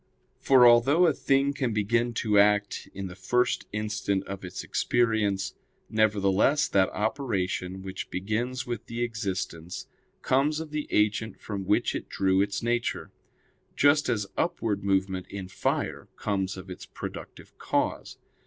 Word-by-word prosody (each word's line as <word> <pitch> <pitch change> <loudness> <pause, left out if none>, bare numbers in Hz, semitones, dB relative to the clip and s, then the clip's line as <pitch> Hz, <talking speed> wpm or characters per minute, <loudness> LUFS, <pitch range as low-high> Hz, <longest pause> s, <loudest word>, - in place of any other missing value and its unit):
For 130 -2 +6
although 125 +9 +6
a 160 - +4
thing 140 +1 +2
can 130 -5 -1
begin 115 +3 +1
to 105 -2 +4
act 105 0 +2
in 100 0 -6
the 90 - -6
first 125 +7 0
instant 105 -2 -1
of 100 -1 -7
its 90 0 -6
existence, 105 -5 +1 0.4
nevertheless, 110 +6 +3
that 95 -1 +3
operation 100 -6 -2
which 95 -1 -6
begins 115 +7 -2
with 120 -3 -5
the 115 +1 -3
existence 95 -6 -4 0.4
comes 145 +4 +2
of 160 -2 -7
the 150 -1 -3
agent 105 -1 +1
from 100 -3 -5
which 105 - +2
it - - -5
drew 95 0 +2
its 100 +2 -1
nature; 120 0 -1 0.6
just 145 +1 +4
as 105 -4 0
upward 115 - -1
movement 95 -1 0
in 95 -2 -6
fire 90 - -2
comes 95 -2 -2
of 95 0 -9
its 90 - -9
productive - - -9
cause. - - -1
105 Hz, 145 wpm, -27 LUFS, 95-120 Hz, 0.6 s, For